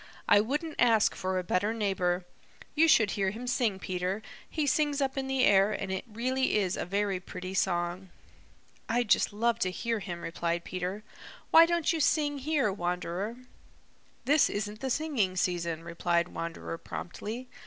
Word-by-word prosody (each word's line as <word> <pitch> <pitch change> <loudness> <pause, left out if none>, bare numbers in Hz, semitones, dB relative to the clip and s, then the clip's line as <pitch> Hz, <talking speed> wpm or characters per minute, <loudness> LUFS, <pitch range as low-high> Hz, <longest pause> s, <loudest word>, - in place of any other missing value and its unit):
"I 205 - +6
wouldn't 295 +8 -3
ask 225 -3 +4
for 185 0 -2
a 185 - -1
better 200 +5 0
neighbor. 185 -4 0 0.5
You 320 +2 +4
should 220 -10 +5
hear 195 -2 0
him 225 +5 -6
sing, 240 -5 +1
Peter. 185 +2 -3 0.3
He 310 -2 -1
sings 290 0 +1
up 270 -1 0
in 270 -1 -2
the 265 -1 +1
air, 200 +1 +5
and 195 -2 -3
it 190 - -3
really 255 +3 0
is 190 -3 0
a - - -4
very 200 0 0
pretty 185 0 -7
song." 180 0 -1 0.8
"I'd 240 -1 +1
just - - +4
love 230 +2 0
to 185 - +1
hear 230 +5 -2
him," 175 -3 -6
replied 170 0 -2
Peter. 185 +4 -4 0.5
"Why 330 +1 +8
don't 340 -1 +1
you 325 - -1
sing 290 -1 +2
here, 275 -7 +1
Wanderer?" 180 +4 -3 0.9
"This 295 +1 +4
isn't 210 +1 -4
the 265 - -3
singing 255 -10 0
season," 170 -3 -1
replied 170 +1 0
Wanderer 165 0 -5
promptly. 225 +8 -6
205 Hz, 165 wpm, -29 LUFS, 180-255 Hz, 0.9 s, Why